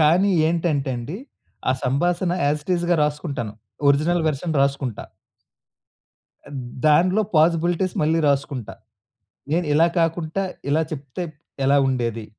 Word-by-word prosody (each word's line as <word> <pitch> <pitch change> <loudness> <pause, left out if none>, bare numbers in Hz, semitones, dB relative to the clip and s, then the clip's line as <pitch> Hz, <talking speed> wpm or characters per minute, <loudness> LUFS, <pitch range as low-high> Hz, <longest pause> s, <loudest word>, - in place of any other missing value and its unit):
కానీ, 175 +6 +4 0.2
ఏంటంటే 160 -5 0
అండి, 130 +10 -5 0.5
ఆ - - +4
సంభాసణ 175 +7 +1
యాజ్ 150 +1 +1
ఇట్ 185 - -1
ఇజ్‌గా 175 0 +1
రాసుకుంటాను. 145 -7 -3 0.4
ఒరిజినల్ 160 +4 +2
వర్షన్ 155 +2 -2
రాసుకుంటా. 135 -5 -2 1.8
దాంట్లో 180 +7 +4
పాసిబిలిటీస్ 170 +3 +2
మళ్ళీ 160 +2 +2
రాసుకుంటా. 135 -8 -1 0.8
నేను 170 -1 +1
ఇలా 165 +2 +5
కాకుంటా 165 +2 -1 0.3
ఇలా 155 +3 +2
చెప్తే 140 +4 -5 0.4
ఎలా 140 +1 +4
ఉండేది? 115 -4 -2
155 Hz, 110 wpm, -22 LUFS, 140-175 Hz, 1.8 s, ఇలా